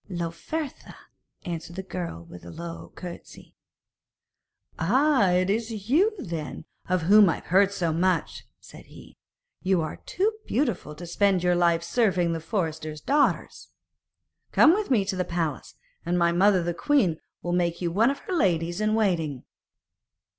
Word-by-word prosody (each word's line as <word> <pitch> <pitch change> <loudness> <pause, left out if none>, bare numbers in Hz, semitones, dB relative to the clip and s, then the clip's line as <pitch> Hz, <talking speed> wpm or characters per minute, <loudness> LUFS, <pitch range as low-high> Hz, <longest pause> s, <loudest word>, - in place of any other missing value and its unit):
'Lauphertha,' 175 - -5 0.5
answered 170 -1 -6
the 190 - -5
girl 175 - -6
with 85 +1 -12
a 85 - -10
low 170 - -8
curtesy. 175 -2 -10 1.3
'Ah! 255 - +3
it 180 +1 +2
is 220 +1 -3
you, 380 +10 +4
then, 165 - -6 0.2
of 185 -2 +1
whom 205 +2 +7
I - - +1
have - - -12
heard 195 +2 +4
so 170 -5 -1
much,' 180 +1 0 0.2
said - - -14
he; - - -15 0.5
'you 190 -1 +2
are 155 - -5
too 405 +4 -1 0.2
beautiful 235 - -1
to 175 +4 -9
spend 190 +1 +1
your 180 0 +3
life 170 -1 +2
serving 180 -3 +1
the 165 - -3
forester's 160 -3 -3
daughters. 285 - 0 0.8
Come 315 - +6
with 420 +2 -1
me 220 -7 +3
to 195 0 -2
the 185 - 0
palace, 165 - -3 0.3
and 175 +1 0
my 170 -1 +3
mother 185 +1 +3
the 175 0 -1
queen 190 - +1 0.2
will 175 - -2
make 170 -1 0
you 175 -2 -2
one 220 +8 +3
of 280 - -2
her 375 - -5
ladies 175 - +1
in 215 0 +1
waiting.' 165 - 0
180 Hz, 160 wpm, -26 LUFS, 170-215 Hz, 1.3 s, whom